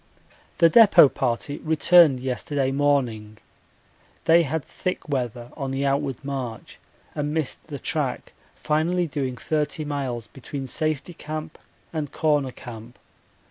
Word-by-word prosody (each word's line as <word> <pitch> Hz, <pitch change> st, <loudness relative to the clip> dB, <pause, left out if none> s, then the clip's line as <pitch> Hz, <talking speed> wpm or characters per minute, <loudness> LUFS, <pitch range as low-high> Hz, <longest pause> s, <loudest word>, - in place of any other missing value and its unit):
The 170 Hz, -, +6 dB
depot 200 Hz, -, +7 dB
party 130 Hz, +3 st, -2 dB
returned 160 Hz, -3 st, +5 dB
yesterday 135 Hz, +1 st, -1 dB
morning. 125 Hz, -7 st, 0 dB, 0.9 s
They 165 Hz, +1 st, +6 dB
had 160 Hz, -1 st, -2 dB
thick 185 Hz, -2 st, -4 dB
weather 120 Hz, -4 st, -3 dB
on 135 Hz, -3 st, -4 dB
the 135 Hz, +1 st, -1 dB
outward 140 Hz, -2 st, 0 dB
march 130 Hz, -5 st, -5 dB, 0.3 s
and 150 Hz, +1 st, -2 dB
missed 155 Hz, -2 st, -3 dB
the 145 Hz, -3 st, -6 dB
track, -, -, -2 dB, 0.2 s
finally 170 Hz, +4 st, 0 dB
doing 135 Hz, -4 st, -3 dB
30 155 Hz, +2 st, -2 dB
miles 135 Hz, -6 st, -3 dB
between 135 Hz, +4 st, -7 dB
Safety 155 Hz, +4 st, -2 dB
Camp 155 Hz, 0 st, -7 dB, 0.3 s
and 150 Hz, -3 st, -3 dB
Corner 145 Hz, -4 st, +1 dB
Camp. 120 Hz, -1 st, -11 dB
140 Hz, 125 wpm, -24 LUFS, 130-155 Hz, 0.9 s, depot